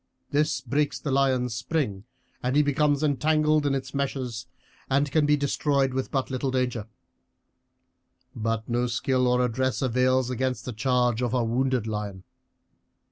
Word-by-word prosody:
This 150 Hz, -2 st, +1 dB
breaks 145 Hz, +3 st, 0 dB
the 145 Hz, -, -3 dB
lion's 130 Hz, -3 st, +2 dB
spring, 120 Hz, -5 st, -2 dB, 0.5 s
he 150 Hz, +1 st, +4 dB
becomes 145 Hz, 0 st, +1 dB
entangled 155 Hz, +1 st, +2 dB
in 135 Hz, -, +1 dB
its 130 Hz, -1 st, -5 dB
meshes, 130 Hz, -4 st, -3 dB, 0.4 s
and 140 Hz, +1 st, +1 dB
can 150 Hz, 0 st, +3 dB
be 150 Hz, 0 st, +4 dB
destroyed 140 Hz, -1 st, +1 dB
with 130 Hz, 0 st, -2 dB
but 135 Hz, -1 st, -2 dB
little 130 Hz, +1 st, -1 dB
danger. 125 Hz, -4 st, -1 dB, 1.5 s
But 115 Hz, -1 st, -2 dB
no 120 Hz, +1 st, 0 dB
skill 125 Hz, +1 st, +1 dB
or 125 Hz, 0 st, +3 dB
address 130 Hz, +2 st, -1 dB
avails 130 Hz, 0 st, +2 dB
against 125 Hz, -1 st, -2 dB
the 125 Hz, -, -4 dB
charge 125 Hz, 0 st, +1 dB
of 125 Hz, 0 st, 0 dB
a 125 Hz, -, +2 dB
wounded 125 Hz, 0 st, 0 dB
lion. 105 Hz, -3 st, -4 dB
130 Hz, 145 wpm, -26 LUFS, 120-140 Hz, 1.5 s, he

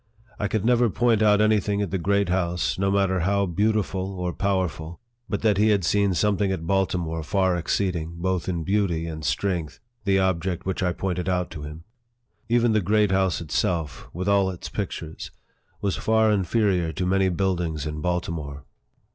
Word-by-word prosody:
I 100 Hz, -, 0 dB
could 110 Hz, 0 st, -1 dB
never 120 Hz, -1 st, +4 dB
point 115 Hz, 0 st, +2 dB
out 105 Hz, -1 st, +5 dB
any 110 Hz, 0 st, +4 dB
thing 100 Hz, 0 st, -1 dB
at 100 Hz, -, -4 dB
the 95 Hz, -, -1 dB
Great 100 Hz, +1 st, +1 dB
House, 90 Hz, 0 st, 0 dB
no 95 Hz, 0 st, +2 dB
matter 95 Hz, -1 st, +2 dB
how 100 Hz, +3 st, +1 dB
beautiful 100 Hz, 0 st, -1 dB
or 90 Hz, -1 st, -2 dB
powerful, 90 Hz, -4 st, -2 dB, 0.3 s
but 105 Hz, -, -2 dB
that 105 Hz, -3 st, +3 dB
he 110 Hz, +1 st, +4 dB
had 100 Hz, -5 st, +2 dB
seen 100 Hz, 0 st, +2 dB
something 100 Hz, +1 st, +1 dB
at 85 Hz, -4 st, -3 dB
Baltimore 90 Hz, -3 st, 0 dB
far 95 Hz, +3 st, +1 dB
exceeding, 85 Hz, -1 st, -1 dB
both 90 Hz, 0 st, -1 dB
in 85 Hz, -3 st, -2 dB
beauty 95 Hz, -4 st, 0 dB
and 80 Hz, -2 st, -6 dB
strength, 80 Hz, -1 st, -2 dB, 0.2 s
the 100 Hz, -1 st, +2 dB
object 95 Hz, -1 st, 0 dB
which 95 Hz, 0 st, -2 dB
I 90 Hz, -1 st, +1 dB
pointed 90 Hz, 0 st, -2 dB
out 90 Hz, -1 st, -1 dB
to 75 Hz, -, -7 dB
him. 75 Hz, +2 st, -8 dB, 0.7 s
Even 120 Hz, 0 st, +3 dB
the 110 Hz, -1 st, +2 dB
Great 105 Hz, +1 st, +2 dB
House 95 Hz, -2 st, +1 dB
itself, 80 Hz, -3 st, -2 dB
with 90 Hz, +3 st, -4 dB
all 100 Hz, -1 st, +3 dB
its 90 Hz, -2 st, -7 dB
pictures, 80 Hz, -1 st, -5 dB, 0.5 s
was 100 Hz, -2 st, -1 dB
far 110 Hz, 0 st, +3 dB
inferior 95 Hz, -3 st, +1 dB
to 95 Hz, -, -2 dB
many 95 Hz, +1 st, +2 dB
buildings 85 Hz, -4 st, -1 dB
in 75 Hz, 0 st, -4 dB
Bal 90 Hz, 0 st, 0 dB
timore. 70 Hz, -5 st, -6 dB
95 Hz, 180 wpm, -24 LUFS, 85-100 Hz, 0.7 s, out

